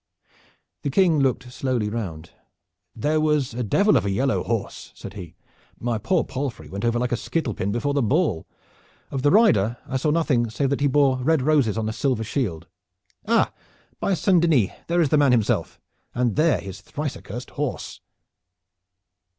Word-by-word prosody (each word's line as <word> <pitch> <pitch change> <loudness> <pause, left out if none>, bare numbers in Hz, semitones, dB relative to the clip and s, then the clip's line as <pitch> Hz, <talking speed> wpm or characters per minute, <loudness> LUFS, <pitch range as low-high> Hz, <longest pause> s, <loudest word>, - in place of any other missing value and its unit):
The 145 - -2
King 165 +1 +3
looked 130 -2 0
slowly 125 -4 -1
round. 95 -8 -5 0.6
"There 150 +7 +1
was 150 -5 +1
a 125 - -3
devil 200 - +3
of - - +3
a 100 - -1
yellow 130 +8 +1
horse," 115 -3 -4
said - - -9
he. 90 -6 -9 0.4
"My 120 -2 -1
poor 165 - +1
palfrey 135 -1 -5
went 100 +1 -6
over 120 0 +1
like 125 +1 -1
a - - +2
skittle 135 0 -2
pin 100 +1 -2
before 140 +6 -1
a 140 - +2
ball. 125 - +1 0.6
Of 135 - -2
the 145 - +4
rider 120 - +4
I 130 0 -2
know 155 - +2
nothing 145 -7 +1
save 135 +4 -1
that 140 - -1
he 145 - +4
bore 135 -1 +3
red 150 +1 +2
roses 140 -8 +2
on 110 -1 -1
a 110 - -2
silver 125 -2 0
shield. 105 - -2 0.6
Ah! - - +2 0.5
by 195 - +1
Saint 180 0 +3
Denis, 145 - +3 0.2
there 175 +1 +2
is 155 - +2
the 150 - +3
man 140 -3 +4
himself, 115 -4 0 0.4
and 120 -2 +1
there 155 +2 +3
his 95 -2 -8
thrice 145 - -4
accursed 120 +5 -8
horse!" 145 -3 -4
130 Hz, 180 wpm, -23 LUFS, 110-150 Hz, 0.6 s, the